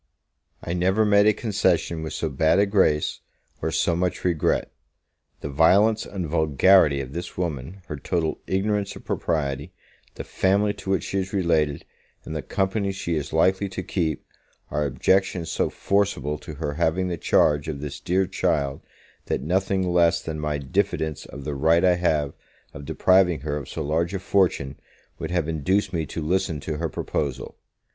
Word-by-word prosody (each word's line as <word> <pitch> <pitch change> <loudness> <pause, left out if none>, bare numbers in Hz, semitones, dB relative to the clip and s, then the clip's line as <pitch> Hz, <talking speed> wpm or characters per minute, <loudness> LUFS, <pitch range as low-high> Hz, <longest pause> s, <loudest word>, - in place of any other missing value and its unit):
I 85 - -3
never 95 +5 +2
made 100 0 +5
a - - +7
concession 95 -7 0
with 80 - -5
so 80 - -2
bad 80 +4 +2
a 100 - +5
grace, 95 -7 +2 0.4
or - - 0
so 80 +2 +1
much 90 +1 -1
regret. 85 -4 +1 0.7
The - - -4
violence 100 +9 +4
and 95 -4 -4
vulgarity 80 0 +4
of 65 0 -8
this 85 +2 -6
woman, 85 +1 -4
her 75 - -6
total 80 +3 -2
ignorance 100 +1 0
of - - -12
propriety, 75 0 -2 0.4
the - - -6
family 100 +2 +1
to 95 - -9
which 95 -4 +1
she 95 - -2
is 95 +2 -4
related, 80 -6 +1 0.4
and 80 - -6
the 75 - -2
company 95 +7 -1
she 95 -3 -3
is 75 +1 -3
likely 95 +5 +2
to 95 - -5
keep, 80 -4 -2 0.5
are 75 -1 0
objections 85 +4 +1
so - - 0
forcible 85 -8 0
to 75 0 -9
her 75 -1 -3
having 85 +4 0
the 90 - -2
charge 75 -1 +2
of 75 -3 -4
this 75 0 -6
dear 95 +2 +1
child, 80 -7 -1 0.5
that - - -1
nothing 95 +3 0
less 85 -1 +3
than 80 -1 -5
my 75 -1 -1
diffidence 80 0 -2
of 70 +1 -9
the 75 +1 -3
right 80 +5 +3
I 90 -1 +4
have 75 -5 0 0.4
of 70 - -9
depriving 90 -2 +3
her 75 0 -3
of 75 - -6
so - - -4
large 85 +5 0
a - - -2
fortune, 90 -8 0 0.4
would - - -4
have 85 -3 0
induced 90 +5 0
me 80 -3 -1
to 80 - -5
listen 80 -1 0
to 75 +1 -4
her 80 +1 -2
proposal. 70 -3 -3
85 Hz, 175 wpm, -24 LUFS, 75-95 Hz, 0.7 s, a